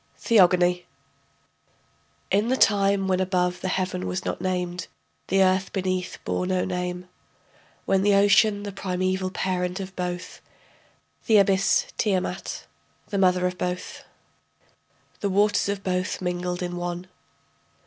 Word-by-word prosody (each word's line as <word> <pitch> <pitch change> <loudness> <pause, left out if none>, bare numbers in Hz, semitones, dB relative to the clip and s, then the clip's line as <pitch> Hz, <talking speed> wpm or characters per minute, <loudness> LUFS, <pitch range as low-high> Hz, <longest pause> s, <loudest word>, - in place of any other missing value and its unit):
THEOGONY 180 -5 +4 1.4
In 205 +4 +2
the 260 +2 +1
time 200 -3 +3
when 185 -1 +1
above 180 -1 0
the - - -2
heaven 185 0 -2
was 185 +1 -3
not - - -3
named, 180 -1 -2 0.4
The 195 +1 +3
earth 185 +1 +1
beneath 185 -1 -2
bore 180 - -1
no 185 -1 0
name, 180 0 -4 0.8
When 195 -1 +2
the 205 0 +4
ocean, 205 +1 +4
the 205 - -5
primeval 185 0 -2
parent 185 0 -2
of 190 -1 -7
both, 180 0 -5 0.9
The 220 - +6
abyss 200 - +3
Tiamat 190 -2 -2 0.4
the 200 - -1
mother 180 -1 +3
of 180 0 -2
both.... 180 0 -4 1.2
The 200 - -1
waters 205 +1 +2
of 200 -1 -3
both 185 0 -1
mingled 180 0 -3
in 175 0 -4
one. 175 0 -4
185 Hz, 130 wpm, -25 LUFS, 180-195 Hz, 1.4 s, The